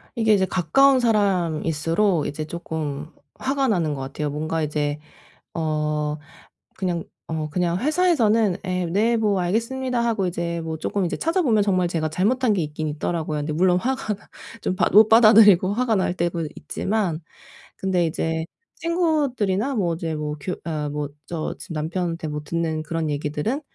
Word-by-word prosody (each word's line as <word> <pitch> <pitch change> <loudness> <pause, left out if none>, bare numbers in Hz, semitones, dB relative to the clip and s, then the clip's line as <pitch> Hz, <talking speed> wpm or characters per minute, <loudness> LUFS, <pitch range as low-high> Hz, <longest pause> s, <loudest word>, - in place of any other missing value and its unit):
이게 220 -2 +3
이제 190 -2 +3
가까운 260 - +4
사람일수록 175 - +1
이제 155 +1 -4
쪼끔 155 -3 -5 0.3
화가 275 0 0
나는 170 -8 +1
것 135 - -5
같아요. 145 +2 -3
뭔가 155 +2 -2
이제 150 0 -1 0.5
어 150 -2 -1 0.6
그냥 180 -3 -1 0.2
어 155 -1 -3
그냥 175 +2 0
회사에서는 235 - +2
"예. 180 -1 -1
네 215 +7 +2
뭐 210 -3 +1
알겠습니다." 240 +7 -1
하고 220 -5 0
이제 170 -1 -3
뭐 160 -1 -4
쪼끔 195 +4 -1
이제 170 - -2
찾아보면 310 - +2
정말 185 -3 +2
제가 165 -2 -1
잘못한 220 - +1
게 190 - 0
있긴 155 0 -3
있더라고요. 155 +1 -2
그런데 150 +1 -2
물론 180 +3 +3
화가 255 -2 -1 0.5
좀 185 - -1
받 - - +1
못 215 +2 +8
받아들이고 215 -4 +7
화가 235 -1 +1
날 185 -2 +1
때도 170 -2 -1
있지만 185 +1 -2 0.6
근데 185 -3 +1
이제 160 0 -2 0.3
친구들이나 280 - 0
뭐 175 -6 0
이제 165 -1 -3
뭐 150 0 -3
교 180 - -3
어 155 -3 -2
뭐 145 0 -3 0.2
저 165 -2 -4
지금 165 - -8
남편한테 165 +1 -2
뭐 150 0 -4
듣는 160 0 -2
그런 160 0 -2
얘기들은 150 - -2
175 Hz, 330 characters per minute, -23 LUFS, 155-215 Hz, 0.6 s, 못